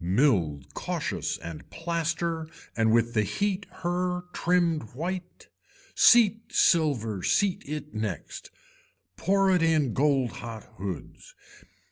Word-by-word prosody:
Milled 90 - +1
cautious - - -3
and 85 -2 -9
plaster 165 -1 -2 0.3
and 110 -1 +3
with 115 +1 +2
the 110 - +3
heat 190 - -1
her 180 0 -2
trimmed 170 -3 +2
white. 180 +4 -5 0.5
Seat 225 -3 +6
silver, 120 - +2
seat 195 - +1
it 150 0 -5
next. 105 -7 -5 0.7
Poor 195 - +2
it 180 -2 +3
in 155 -6 +2
gold 135 -3 +2
hot 115 -2 -8 0.2
hoods. 95 -4 -7
155 Hz, 110 wpm, -27 LUFS, 110-180 Hz, 0.7 s, Seat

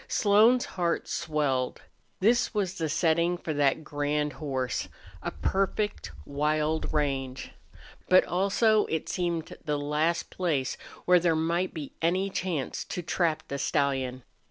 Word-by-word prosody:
Slone's 220 +5 +4
heart 170 -2 -1
swelled. 145 -6 -1 0.4
This 235 +3 +3
was 195 -2 -1
the 160 -1 -1
setting 170 +2 +2
for 160 -2 -4
that 145 +1 +2
grand 150 0 -1
horse 130 -4 -2 0.3
a - - -2
perfect 195 +2 -1
wild 150 +2 0
range. 135 -3 -2 0.6
But 185 0 +6
also 205 +4 +2
it 160 -1 -2
seemed 170 -3 -2
the 150 -1 -1
last 150 +4 0
place 150 -8 -1 0.3
where 180 0 +6
there 170 -1 +2
might 170 +3 0
be 150 -4 -6
any 185 +4 +1
chance 170 -8 -2
to 180 - -5
trap 165 -2 0
the 140 - -4
stallion. 135 -3 0
160 Hz, 130 wpm, -28 LUFS, 145-180 Hz, 0.6 s, But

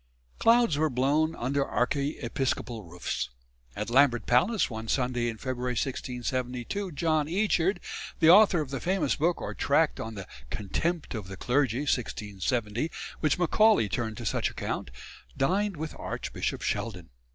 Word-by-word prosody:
Clouds 230 -10 +4
were 155 0 +3
blown 145 +5 +1
under 140 +3 0
archiepiscopal 130 -3 -1
roofs. 85 -6 -4 0.5
At 105 +3 -4
Lambeth 125 -3 +4
Palace 180 - +3
one 110 -1 -6
Sunday 125 -1 0
in 115 - -5
February 125 0 -2
1672 125 - -3
John 155 0 +1
Eachard, 190 +1 +1 0.4
the 160 - +5
author 185 -1 +7
of 140 -3 -5
the 135 - -2
famous 190 +6 +1
book 170 +3 +1
or - - -4
tract 150 +2 +2
on 115 0 -5
"The 95 -2 -7 0.2
Contempt 160 - -2
of 105 -5 -5
the 95 0 -8
Clergy," 125 +2 +1
1670, 115 - -1 0.3
which 155 -3 +2
Macaulay 195 - +4
turned 110 +1 -3
to - - -6
such - - 0
account, - - -4 0.5
dined 195 +6 +1
with 155 +1 -4
Archbishop - - -3
Sheldon. 90 - -3
135 Hz, 140 wpm, -28 LUFS, 120-160 Hz, 0.5 s, author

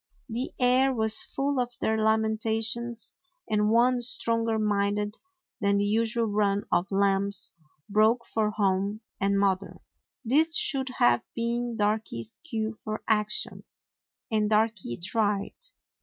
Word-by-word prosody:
The 245 +2 -4
air 255 +2 +4
was 220 -3 +1
full 275 0 -2
of 245 -1 -2
their 220 - +1
lamentations, 220 +1 0 0.3
and 210 -1 +1
one 245 +2 +3
stronger 230 -2 +1
minded 205 0 0 0.4
than 200 -2 +2
the 200 - +1
usual 230 +2 +1
run 205 -1 +1
of 175 - +2
lambs 200 0 +1 0.3
broke 220 +3 +3
for 215 -1 0
home 200 0 0 0.2
and 200 +1 +1
mother. 195 -1 0 0.5
This 310 +7 +3
should 265 -2 -1
have 120 0 +4
been 235 0 -2
Darky's 205 - -2
cue 225 -7 -3
for 215 0 -4
action, 210 -1 -1 0.7
and 215 -1 +1
Darky 215 - 0
tried. 205 +2 -1
220 Hz, 125 wpm, -27 LUFS, 205-235 Hz, 0.7 s, air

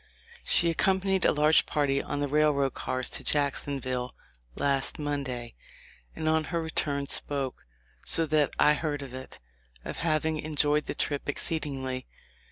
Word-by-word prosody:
She 170 -2 +4
accompanied 190 +2 +1
a - - +5
large 150 +1 +4
party 140 -2 +1
on 145 - -4
the 145 - 0
railroad 145 -2 +2
cars 130 0 -2
to - - -4
Jacksonville 135 -3 -1 0.4
last 135 -1 0
Monday, 135 -5 -4 0.6
and 155 - -3
on 160 0 +2
her 170 +2 -2
return 145 -3 0
spoke, 135 - -2 0.4
so 165 - +5
that 150 -2 +2
I 150 - +5
heard 150 -2 -3
of 130 -2 -10
it, 130 0 -9 0.5
of - - -5
having 155 -1 0
enjoyed 150 -1 +1
the - - -3
trip 145 -1 -2
exceedingly. 135 -5 -1
145 Hz, 145 wpm, -28 LUFS, 135-155 Hz, 0.6 s, a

